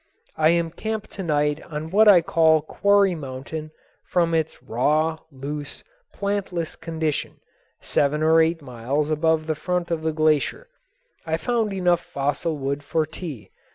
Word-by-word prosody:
I 155 Hz, 0 st, +4 dB
am 170 Hz, -1 st, +1 dB
camped 220 Hz, +5 st, -4 dB
to 195 Hz, -, -6 dB
night 150 Hz, -3 st, 0 dB
on 155 Hz, +1 st, -6 dB
what 215 Hz, +3 st, +5 dB
I 190 Hz, -4 st, +8 dB
call 160 Hz, -2 st, +4 dB
Quarry 200 Hz, +3 st, +3 dB
Mountain 150 Hz, +1 st, -6 dB, 0.4 s
from 170 Hz, -2 st, +1 dB
its 160 Hz, -5 st, -1 dB
raw, 150 Hz, +7 st, +1 dB
loose, 145 Hz, +2 st, -6 dB, 0.3 s
plantless 200 Hz, -5 st, -3 dB
condition, 160 Hz, -2 st, -3 dB, 0.4 s
seven 150 Hz, +2 st, +1 dB
or 160 Hz, +1 st, +5 dB
eight 165 Hz, -1 st, +1 dB
miles 135 Hz, +4 st, -2 dB
above 160 Hz, 0 st, +2 dB
the 160 Hz, -, 0 dB
front 175 Hz, +2 st, -2 dB
of 165 Hz, -1 st, -1 dB
the 160 Hz, 0 st, 0 dB
glacier. 155 Hz, -, +1 dB, 0.5 s
I 160 Hz, 0 st, -1 dB
found 230 Hz, +1 st, 0 dB
enough 180 Hz, -3 st, +2 dB
fossil 150 Hz, 0 st, -2 dB
wood 140 Hz, +1 st, -2 dB
for 155 Hz, +2 st, 0 dB
tea. 150 Hz, -, -8 dB
160 Hz, 150 wpm, -23 LUFS, 150-170 Hz, 0.5 s, I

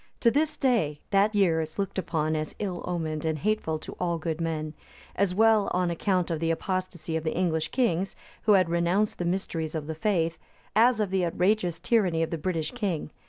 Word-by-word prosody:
To 235 Hz, -, +5 dB
this 305 Hz, +3 st, +1 dB
day, 215 Hz, -, +1 dB
that 205 Hz, +2 st, +3 dB
year 175 Hz, -5 st, +3 dB
is 155 Hz, 0 st, -6 dB
looked 195 Hz, -1 st, -2 dB
upon 155 Hz, -3 st, -1 dB
as 155 Hz, -1 st, -3 dB
ill 185 Hz, -4 st, -3 dB
omened, 160 Hz, -3 st, -2 dB
and 160 Hz, -1 st, 0 dB
hateful 185 Hz, -3 st, 0 dB
to 155 Hz, -, -9 dB
all 170 Hz, -1 st, 0 dB
good 165 Hz, 0 st, -3 dB
men; 155 Hz, -2 st, -2 dB, 0.4 s
as 190 Hz, -2 st, +1 dB
well 220 Hz, -1 st, +4 dB
on 180 Hz, -1 st, +1 dB
account 180 Hz, 0 st, 0 dB
of 160 Hz, -, -1 dB
the 165 Hz, 0 st, 0 dB
apostacy 175 Hz, -1 st, -2 dB
of 160 Hz, -, -1 dB
the 160 Hz, 0 st, -2 dB
English 160 Hz, -3 st, +1 dB
kings, 195 Hz, -6 st, 0 dB, 0.3 s
who 215 Hz, -, +6 dB
had 185 Hz, -3 st, +5 dB
renounced 170 Hz, +5 st, +1 dB
the 175 Hz, -, -1 dB
mysteries 170 Hz, -3 st, -2 dB
of 155 Hz, -2 st, -3 dB
the 160 Hz, -, -4 dB
faith, 165 Hz, -1 st, 0 dB, 0.4 s
as 230 Hz, +1 st, +5 dB
of 205 Hz, -3 st, 0 dB
the 190 Hz, -1 st, +1 dB
outrageous 180 Hz, 0 st, +1 dB
tyranny 180 Hz, -7 st, +2 dB
of 165 Hz, -, -3 dB
the 165 Hz, -, -2 dB
British 165 Hz, -2 st, -2 dB
king. 195 Hz, -11 st, -3 dB
175 Hz, 205 wpm, -27 LUFS, 160-200 Hz, 0.4 s, who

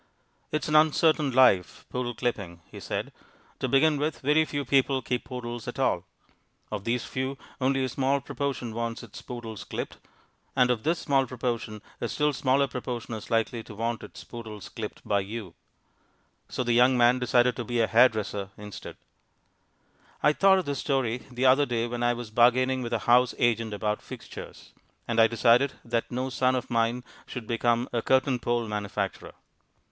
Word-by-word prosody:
"It 155 Hz, -, -1 dB
is -, -, -3 dB
an 155 Hz, -, +1 dB
uncertain 155 Hz, -1 st, +4 dB
life, 125 Hz, -9 st, +3 dB
poodle 120 Hz, -1 st, -3 dB
clipping," 100 Hz, -8 st, -3 dB
he -, -, -9 dB
said, -, -, -4 dB, 0.5 s
"To -, -, -1 dB
begin 150 Hz, +2 st, +4 dB
with, 150 Hz, +1 st, -2 dB
very 150 Hz, +3 st, +3 dB
few 145 Hz, -2 st, -3 dB
people 135 Hz, -1 st, +2 dB
keep 125 Hz, +1 st, -2 dB
poodles 120 Hz, -2 st, -6 dB
at -, -, -5 dB
all. -, -, +1 dB, 0.7 s
Of 105 Hz, -2 st, -4 dB
these 120 Hz, +1 st, 0 dB
few, 130 Hz, +1 st, -3 dB, 0.2 s
only 135 Hz, +1 st, +2 dB
a -, -, +1 dB
small 135 Hz, +3 st, +1 dB
proportion 135 Hz, -4 st, -4 dB
wants 115 Hz, +1 st, -3 dB
its 115 Hz, -, -10 dB
poodles 115 Hz, -4 st, -7 dB
clipped. -, -, -5 dB, 0.6 s
And, 125 Hz, -2 st, +4 dB
of 120 Hz, -3 st, -1 dB
this 165 Hz, +6 st, +1 dB
small 135 Hz, -3 st, +1 dB
proportion, 115 Hz, -4 st, -4 dB, 0.2 s
a -, -, 0 dB
still 150 Hz, 0 st, +1 dB
smaller 135 Hz, +1 st, +2 dB
proportion 125 Hz, -2 st, -5 dB
is 110 Hz, -1 st, -7 dB
likely 115 Hz, 0 st, 0 dB
to 110 Hz, -, -11 dB
want 115 Hz, +2 st, -2 dB
its -, -, -10 dB
poodles 110 Hz, -4 st, -9 dB
clipped 110 Hz, -2 st, -7 dB
by 100 Hz, -, +2 dB
you." 100 Hz, -2 st, -6 dB, 1.0 s
So 125 Hz, -, -2 dB
the 120 Hz, -1 st, +1 dB
young 125 Hz, +2 st, +5 dB
man 120 Hz, +1 st, +5 dB
decided 125 Hz, 0 st, +3 dB
to 120 Hz, -, -2 dB
be 120 Hz, +1 st, -2 dB
a 115 Hz, -, +4 dB
hair 120 Hz, +3 st, +6 dB
dresser 105 Hz, -2 st, -4 dB
instead. 105 Hz, -1 st, -9 dB, 1.3 s
I 150 Hz, -, +5 dB
thought 195 Hz, +3 st, +5 dB
of 185 Hz, -, -1 dB
this 140 Hz, -2 st, -2 dB
story 125 Hz, -4 st, -1 dB
the 125 Hz, +1 st, -1 dB
other 135 Hz, +2 st, +5 dB
day 115 Hz, -1 st, 0 dB
when 120 Hz, 0 st, -4 dB
I 120 Hz, 0 st, +3 dB
was 120 Hz, -2 st, -7 dB
bargaining 130 Hz, +3 st, +3 dB
with 120 Hz, -, -4 dB
a -, -, +3 dB
house 125 Hz, +1 st, +4 dB
agent 115 Hz, -2 st, +1 dB
about 105 Hz, +1 st, -2 dB
"fixtures," -, -, -10 dB, 0.3 s
and 115 Hz, -1 st, 0 dB
I 115 Hz, -, +7 dB
decided 120 Hz, +4 st, +3 dB
that 115 Hz, -1 st, -1 dB
no 130 Hz, +2 st, -3 dB
son 130 Hz, +1 st, +2 dB
of 130 Hz, 0 st, -4 dB
mine 115 Hz, +1 st, +1 dB, 0.2 s
should 125 Hz, -3 st, -6 dB
become 120 Hz, +1 st, +1 dB
a 120 Hz, -, +1 dB
curtain 130 Hz, +1 st, +2 dB
pole 120 Hz, 0 st, 0 dB
manufacturer. 105 Hz, -2 st, -4 dB
120 Hz, 185 wpm, -27 LUFS, 115-130 Hz, 1.3 s, I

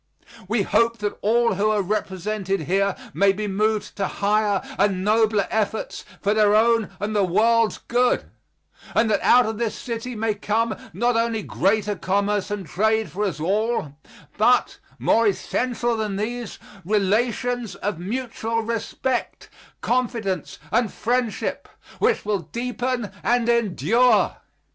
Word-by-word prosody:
We 215 Hz, 0 st, +1 dB
hope 230 Hz, +3 st, +2 dB
that 205 Hz, -1 st, -4 dB
all 230 Hz, +1 st, +3 dB
who 200 Hz, +3 st, +1 dB
are 210 Hz, -2 st, +1 dB
represented 195 Hz, -1 st, -2 dB
here 195 Hz, +5 st, +1 dB, 0.2 s
may 200 Hz, 0 st, +4 dB
be 210 Hz, +2 st, -3 dB
moved 215 Hz, +2 st, -1 dB
to 195 Hz, -2 st, 0 dB
higher 205 Hz, 0 st, +1 dB, 0.2 s
and 195 Hz, -2 st, +2 dB
nobler 215 Hz, -1 st, +3 dB
efforts 220 Hz, 0 st, -2 dB, 0.2 s
for 205 Hz, +1 st, +1 dB
their 210 Hz, -1 st, +4 dB
own 230 Hz, -1 st, +3 dB
and 210 Hz, +2 st, -3 dB
the 205 Hz, -, +3 dB
world's 225 Hz, +4 st, +3 dB
good, 245 Hz, +1 st, +1 dB, 0.7 s
and 225 Hz, -1 st, +3 dB
that 205 Hz, -, +2 dB
out 250 Hz, 0 st, +5 dB
of 220 Hz, 0 st, -3 dB
this 230 Hz, -2 st, -1 dB
city 235 Hz, +1 st, -5 dB
may 220 Hz, 0 st, 0 dB
come 215 Hz, +2 st, -1 dB, 0.2 s
not 240 Hz, +7 st, +1 dB
only 230 Hz, -2 st, 0 dB
greater 205 Hz, +3 st, 0 dB
commerce 200 Hz, +1 st, 0 dB
and 205 Hz, -2 st, -4 dB
trade 220 Hz, +7 st, 0 dB
for 205 Hz, +3 st, -1 dB
us 180 Hz, -6 st, -3 dB
all, 195 Hz, -3 st, -1 dB, 0.4 s
but, -, -, +3 dB, 0.2 s
more 230 Hz, 0 st, +3 dB
essential 240 Hz, +4 st, -1 dB
than 215 Hz, -3 st, -2 dB
these, 230 Hz, +3 st, -4 dB, 0.3 s
relations 220 Hz, +3 st, 0 dB
of 200 Hz, -4 st, -3 dB
mutual 230 Hz, +2 st, -3 dB
respect, 235 Hz, +2 st, -3 dB, 0.3 s
confidence 230 Hz, -, -1 dB
and 230 Hz, -2 st, +2 dB
friendship 240 Hz, -1 st, -2 dB, 0.3 s
which 450 Hz, -, +1 dB
will 210 Hz, -1 st, 0 dB
deepen 245 Hz, -, -3 dB
and 240 Hz, -1 st, +1 dB
endure. 235 Hz, -, +3 dB
215 Hz, 140 wpm, -23 LUFS, 200-235 Hz, 0.7 s, out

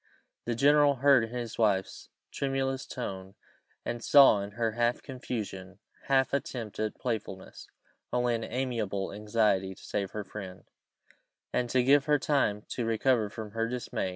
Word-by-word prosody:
The 120 Hz, -, -1 dB
general 145 Hz, +3 st, +5 dB
heard 135 Hz, -2 st, +5 dB
in -, -, -11 dB
his 120 Hz, -1 st, -5 dB
wife's 100 Hz, -4 st, 0 dB, 0.2 s
tremulous 135 Hz, -1 st, -2 dB
tone, 95 Hz, -6 st, -6 dB, 0.5 s
and 120 Hz, -1 st, -4 dB
saw 135 Hz, -8 st, +7 dB
in 100 Hz, +1 st, -7 dB
her 115 Hz, 0 st, 0 dB
half 120 Hz, +2 st, 0 dB
confusion, 105 Hz, -8 st, -6 dB, 0.3 s
half 135 Hz, -1 st, +2 dB
attempt 120 Hz, -7 st, -3 dB
at 110 Hz, -1 st, -1 dB
playfulness, 110 Hz, -6 st, -5 dB, 0.4 s
only 125 Hz, 0 st, +1 dB
an 115 Hz, -1 st, -2 dB
amiable 110 Hz, -7 st, -2 dB
anxiety 105 Hz, -2 st, +1 dB
to -, -, -17 dB
save 100 Hz, -2 st, -2 dB
her 105 Hz, +1 st, -5 dB
friend, 95 Hz, -2 st, -9 dB, 0.9 s
and 125 Hz, -1 st, 0 dB
to 130 Hz, 0 st, +2 dB
give 140 Hz, +2 st, +5 dB
her 150 Hz, -1 st, +3 dB
time 130 Hz, -8 st, 0 dB
to 120 Hz, -, -3 dB
recover 115 Hz, 0 st, +1 dB
from 110 Hz, 0 st, -8 dB
her 115 Hz, +1 st, -1 dB
dismay. 125 Hz, -6 st, -3 dB
115 Hz, 155 wpm, -29 LUFS, 105-130 Hz, 0.9 s, saw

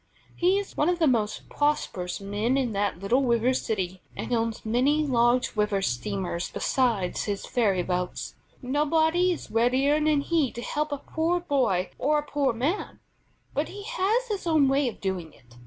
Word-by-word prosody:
He 365 Hz, +3 st, +3 dB
is 405 Hz, -1 st, -4 dB
one 300 Hz, -, +2 dB
of 355 Hz, -, +1 dB
the 335 Hz, -, +3 dB
most 225 Hz, -6 st, 0 dB
prosperous 190 Hz, -12 st, -1 dB
men 205 Hz, +6 st, -1 dB
in 255 Hz, -4 st, 0 dB
the 200 Hz, -1 st, 0 dB
little 200 Hz, +9 st, +1 dB
river 240 Hz, 0 st, +2 dB
city, 190 Hz, -7 st, -2 dB
and -, -, -4 dB
owns 225 Hz, -1 st, -1 dB
many 270 Hz, +7 st, +2 dB
large 245 Hz, -2 st, +2 dB
river 210 Hz, -2 st, +1 dB
steamers 180 Hz, +5 st, -2 dB
besides 230 Hz, -9 st, 0 dB
his 200 Hz, -2 st, -3 dB
ferry 200 Hz, -7 st, +1 dB
boats. 180 Hz, 0 st, -3 dB, 0.3 s
Nobody 320 Hz, +6 st, +2 dB
is 345 Hz, -, -5 dB
readier 260 Hz, +6 st, +3 dB
than 300 Hz, -2 st, +3 dB
he 305 Hz, -4 st, +1 dB
to 240 Hz, -, -6 dB
help 300 Hz, 0 st, -2 dB
a 285 Hz, -, -1 dB
poor 325 Hz, +5 st, -1 dB
boy 260 Hz, -, 0 dB
or 300 Hz, +3 st, +2 dB
a 295 Hz, -, 0 dB
poor 285 Hz, -3 st, +1 dB
man; 275 Hz, -, -2 dB, 0.5 s
but -, -, -1 dB
he 405 Hz, 0 st, -8 dB
has 440 Hz, +5 st, 0 dB
his 400 Hz, -4 st, -3 dB
own 310 Hz, -4 st, +4 dB
way 270 Hz, 0 st, +2 dB
of 235 Hz, -, -5 dB
doing 185 Hz, -5 st, -3 dB
it. 120 Hz, -2 st, -21 dB
255 Hz, 175 wpm, -26 LUFS, 205-300 Hz, 0.5 s, own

